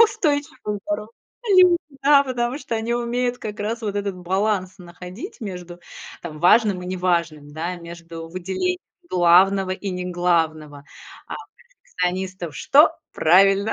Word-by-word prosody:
устойчивые 300 - +1
и - - -7
здоровые 210 +2 -3 0.4
люди. 365 -1 +7 0.3
Да. 280 0 +6
Потому 250 -1 -2
что 230 -6 -4
они 230 +2 -1
умеют 245 +1 -1
как 210 -1 -6
раз 225 +3 -3
вот 205 -2 -3
этот 200 -2 -2
баланс 190 +1 -1
находить 180 - -10
между, 180 -4 -7 0.4
там, 155 -3 -7
важным 195 +2 +4
и - - -7
неважным, 170 -5 -1
да, 165 +4 -3
между 170 -1 -9
выделением 190 - -2 0.3
главного 185 - +4
и 190 +1 -3
неглавного. 170 -5 -1 0.4
А - - -5
у - - -5 0.2
перфекционистов 185 - -5
что? 295 +3 +5 0.2
Правильно! 195 +5 +4
190 Hz, 135 wpm, -22 LUFS, 175-235 Hz, 0.4 s, люди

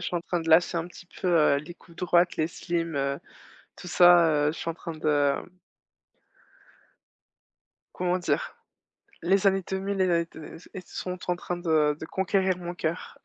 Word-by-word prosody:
suis 175 - -2
en - - -1
train 175 0 -2
de 165 - -6
lâcher 170 +2 +5
un 165 0 -2
petit 180 0 -14
peu, 185 - 0
heu, 155 -4 +4
les 150 +5 -7
coupes 170 -1 -20
droites, 175 0 +2
les 155 +1 0
slims, 170 -3 -3
heu, 140 0 -1 0.6
tout 180 - -10
ça, 175 -1 +6 0.2
heu. 150 - +2
Je 160 - -9
suis - - -4
en 165 - -2
train 170 0 -7
de, 155 0 -5 0.3
hem - - -9 2.5
comment 180 0 0
dire? 175 - -2 0.7
Les 195 +3 +2
années 195 -1 +3
2000 195 +1 -2
et 175 -3 +3
et 165 - -3
t 160 - -13 0.3
et 190 - -6
sont 180 0 -5
en 175 - +1
train 175 0 -5
de 155 -4 +2
de 160 - -6
conquérir 190 0 0
mon 175 0 -6
cœur. 165 -1 -4
175 Hz, 185 wpm, -27 LUFS, 165-180 Hz, 2.5 s, ça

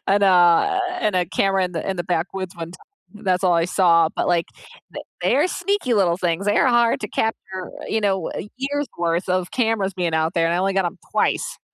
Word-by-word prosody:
in, 200 +1 +3
uh 185 - +4 0.2
in 210 -3 +1
a 180 -1 +1
camera 195 +1 +1
in 180 - -5
the 165 +2 -4
in 190 - -3
the 175 - -3
backwoods 180 +1 -3
one 165 0 -6
time, - - -15 0.4
that's 185 0 +1
all 180 - +4
I 170 0 +2
saw, 170 -3 +4
but - - 0
like 170 -1 +1 0.5
they - - -5 0.2
they're 295 +8 +2
sneaky 360 -9 -1
little 175 -4 +2
things, 180 +2 -1
they 205 - +2
are - - +4
hard 235 -1 +3
to 210 - -5
capture, 190 -4 -3
uh, - - -8
you 220 - -1
know, 190 -4 0
uh, - - -5 0.2
years 285 +2 -2
worth 170 +2 -1
of 185 0 0
cameras 225 -5 0
being 175 -3 -1
out 160 +1 +1
there 165 -1 +2
and 165 - 0
I - - 0
only 195 +1 +1
got 195 -2 +1
'em 170 - -5 0.2
twice. - - 0
185 Hz, 230 wpm, -21 LUFS, 175-205 Hz, 0.5 s, uh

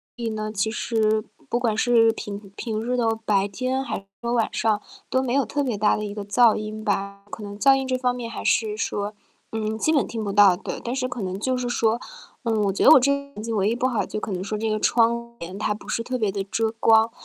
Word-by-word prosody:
所 240 - -7
以 225 - 0
呢， 215 0 -4
其 220 +1 0
实 220 -2 0 0.2
不 240 - +1
管 225 -3 0
是 225 -1 +4
平 200 -1 -6 0.2
平 220 -2 -3
日 250 +2 -1
的 235 -2 +2 0.2
白 200 -2 +3
天 255 +5 -2
还 200 -6 -5 0.2
是 235 - -3
晚 235 -2 +2
上 215 -2 +1 0.3
都 260 - +2
没 250 -2 -1
有 275 0 +3
特 290 - -2
别 245 -7 -1
大 210 +1 +3
的 210 - -3
一 205 - -5
个 205 - -5
噪 220 +3 +4
音 215 0 -5
吧， 200 -2 -2
可 210 - -8
能 205 0 -8
噪 270 +2 +6
音 270 - -1
这 255 -1 0
方 250 -1 0
面 235 -2 -5
还 - - -6
是 215 -2 +1
说， 205 -1 -2 0.4
嗯， 220 0 -2
基 315 - +1
本 290 -4 +2
听 225 -2 -4
不 200 - -2
到， 200 -2 +6
对。 - - -6
但 240 +2 -2
是 255 -1 -1
可 245 -2 -5
能 185 -1 -3
就 255 +4 0
是 250 -1 -2
说， 230 -1 +1 0.4
呃， 230 - 0
我 200 - +2
觉 190 - -1
得 - - +9
我 - - +10
这 280 +3 +3 0.2
房 210 - -7
子 230 - -3
唯 200 -2 +1
一 230 - 0
不 245 - -1
好 240 -4 0
就 - - -5
可 210 - -5
能 185 -1 -2
说 210 +1 -3
这 220 +1 -1
个 215 0 0
窗 235 +1 +2
帘 180 +3 -6
它 210 - 0
不 205 -1 -12
是 230 - 0
特 255 +2 -2
别 215 -5 0
地 195 -1 -3
遮 220 +1 0
光。 225 0 +5
220 Hz, 285 characters per minute, -24 LUFS, 210-240 Hz, 0.4 s, 我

